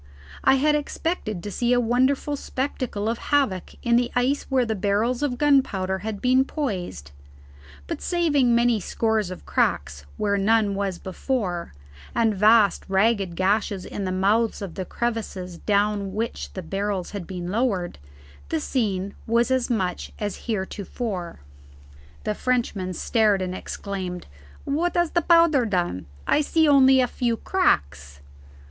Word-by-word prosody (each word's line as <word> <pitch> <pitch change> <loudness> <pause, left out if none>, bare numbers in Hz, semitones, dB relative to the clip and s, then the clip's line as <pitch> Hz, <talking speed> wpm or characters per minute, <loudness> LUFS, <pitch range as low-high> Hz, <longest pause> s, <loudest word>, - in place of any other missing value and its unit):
I 265 - +5
had 300 +3 +3
expected 295 - -2
to 205 - -5
see 240 +4 +1
a 245 - +4
wonderful 260 +5 +1
spectacle 255 -6 -3
of 230 +1 -1
havoc 270 -11 +1
in 235 0 +4
the 240 0 +1
ice 255 +4 +1
where 260 -2 +2
the 220 - -1
barrels 215 +5 0
of 270 -4 -1
gunpowder 235 -10 +2
had 210 +1 -5
been 255 +1 +4
poised, 180 - -4 0.7
but - - -5
saving 290 -9 +2
many 235 -1 +3
scores 220 0 0
of 185 - -9
cracks 70 0 -1
where 200 -1 +1
none 210 0 +3
was 195 -2 -2
before, 185 - -3 0.4
and 225 -2 +3
vast 210 0 +4
ragged 195 -2 +2
gashes 195 0 0
in 200 - -5
the 185 - -2
mouths 205 +5 +1
of 195 -5 -6
the 185 - -4
crevices 195 -8 -4
down 205 -1 0
which 225 +2 -3
the 185 - -6
barrels 195 +1 -3
had 200 -4 -6
been 180 -2 -5
lowered, 200 - -1 0.5
the - - 0
scene 200 - -1
was 240 +3 +2
much 190 -7 -2
as 205 +1 -5
heretofore. 195 - -4 0.8
The 210 - -1
Frenchman 210 -7 -1
stared 215 +1 +2
and 185 -1 -3
exclaimed, 185 -2 -5 0.4
"What 325 +5 0
has 345 -2 +2
the 345 - +2
powder 335 -5 +5
done? 175 - -1 0.2
I 300 - +3
see 320 +2 +2
only 265 -2 +6
a 250 - +2
few 235 -1 -1
cracks." 70 - 0
215 Hz, 145 wpm, -24 LUFS, 190-255 Hz, 0.8 s, only